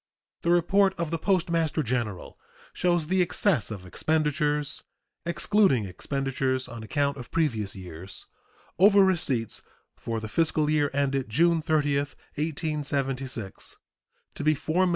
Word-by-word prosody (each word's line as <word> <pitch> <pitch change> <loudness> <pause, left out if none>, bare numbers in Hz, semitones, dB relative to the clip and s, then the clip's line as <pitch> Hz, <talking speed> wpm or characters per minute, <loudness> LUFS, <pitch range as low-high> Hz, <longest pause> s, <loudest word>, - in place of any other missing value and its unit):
The 170 - -1
report 190 +3 +4
of 170 -2 -2
the 165 - -1
Postmaster 165 -4 +1
General 115 -6 -3 0.4
shows 175 -3 +1
the 185 +3 +2
excess 175 - +2
of 100 -4 -7
expenditures 150 - 0 0.5
(excluding 170 - +3
expenditures 130 +5 -2
on 115 -2 -8
account 140 +6 0
of 125 -2 -9
previous 115 -12 -1
years) 90 0 -8 0.5
over 200 +1 +7
receipts 140 - 0 0.3
for 115 -1 -4
the 110 - -5
fiscal 155 +3 +1
year 150 -2 +2
ended 135 -3 0
June 165 +7 +3
30, 150 -2 +1
1876, 140 - -3 0.6
to - - -5
be 155 +1 +4
$4,151,988. 170 +5 +1
145 Hz, 125 wpm, -27 LUFS, 125-165 Hz, 0.6 s, over